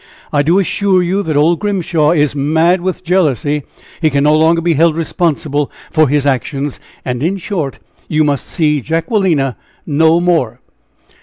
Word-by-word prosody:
I 145 Hz, -, +3 dB
do 165 Hz, +6 st, +2 dB
assure 195 Hz, 0 st, +1 dB
you 190 Hz, +3 st, 0 dB
that 155 Hz, -6 st, -2 dB
old 160 Hz, +3 st, +3 dB
Grimshaw 175 Hz, -7 st, 0 dB
is 150 Hz, -4 st, +1 dB
mad 160 Hz, +5 st, +2 dB
with 185 Hz, 0 st, -3 dB
jealousy. 150 Hz, -, 0 dB, 0.4 s
He 160 Hz, -, +3 dB
can 140 Hz, -1 st, 0 dB
no 150 Hz, +1 st, +4 dB
longer 160 Hz, +2 st, +3 dB
be 170 Hz, 0 st, +1 dB
held 160 Hz, +1 st, +2 dB
responsible 155 Hz, -3 st, -1 dB, 0.2 s
for 155 Hz, -1 st, +3 dB
his 145 Hz, 0 st, +1 dB
actions. 140 Hz, +1 st, -2 dB, 0.3 s
And 125 Hz, -1 st, -3 dB
in 180 Hz, +6 st, 0 dB
short, 170 Hz, -7 st, -4 dB, 0.3 s
you 155 Hz, 0 st, +1 dB
must 145 Hz, -2 st, -1 dB
see 150 Hz, -4 st, 0 dB
Jacquelina 165 Hz, -, 0 dB, 0.3 s
no 160 Hz, +2 st, +3 dB
more!" 160 Hz, -10 st, 0 dB
160 Hz, 160 wpm, -14 LUFS, 145-175 Hz, 0.4 s, no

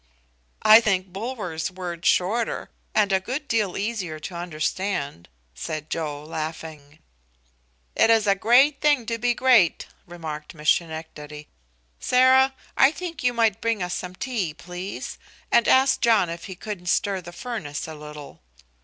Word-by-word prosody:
"I 215 Hz, +1 st, +9 dB
think 190 Hz, -4 st, 0 dB
Bulwer's 195 Hz, -7 st, -4 dB
word 175 Hz, -2 st, -5 dB
shorter, 220 Hz, +6 st, +1 dB, 0.2 s
and 210 Hz, -2 st, +3 dB
a 190 Hz, -, +3 dB
good 260 Hz, +9 st, -5 dB
deal 210 Hz, -5 st, 0 dB
easier 200 Hz, -7 st, -3 dB
to 180 Hz, -, -7 dB
understand," 170 Hz, -, -3 dB, 0.2 s
said 155 Hz, -, -6 dB
Joe, 150 Hz, -3 st, -3 dB
laughing. 155 Hz, -1 st, -7 dB, 1.0 s
"It -, -, +4 dB
is 225 Hz, -2 st, +4 dB
a 200 Hz, -, +4 dB
great 250 Hz, +8 st, +4 dB
thing 290 Hz, -5 st, +3 dB
to 230 Hz, 0 st, -3 dB
be 240 Hz, +1 st, +1 dB
great," 240 Hz, -10 st, +4 dB, 0.2 s
remarked 160 Hz, -3 st, -7 dB
Miss 150 Hz, -1 st, +3 dB
Schenectady. 155 Hz, -2 st, -5 dB, 0.5 s
"Sarah, 260 Hz, +1 st, +4 dB, 0.2 s
I 270 Hz, -, +6 dB
think 330 Hz, -1 st, -7 dB
you 250 Hz, -, +3 dB
might 225 Hz, -3 st, +1 dB
bring 225 Hz, -4 st, 0 dB
us 180 Hz, 0 st, -3 dB
some 180 Hz, 0 st, -5 dB
tea, 200 Hz, -, -3 dB
please, 180 Hz, +4 st, -7 dB, 0.3 s
and 235 Hz, -, +4 dB
ask 265 Hz, +1 st, +4 dB
John 220 Hz, -7 st, +3 dB
if 170 Hz, 0 st, -7 dB
he 190 Hz, -, -7 dB
couldn't 180 Hz, -2 st, -7 dB
stir 195 Hz, +1 st, +1 dB
the 175 Hz, 0 st, -10 dB
furnace 175 Hz, -, -5 dB
a 160 Hz, -, -7 dB
little. 150 Hz, -1 st, -10 dB
185 Hz, 150 wpm, -24 LUFS, 160-230 Hz, 1.0 s, I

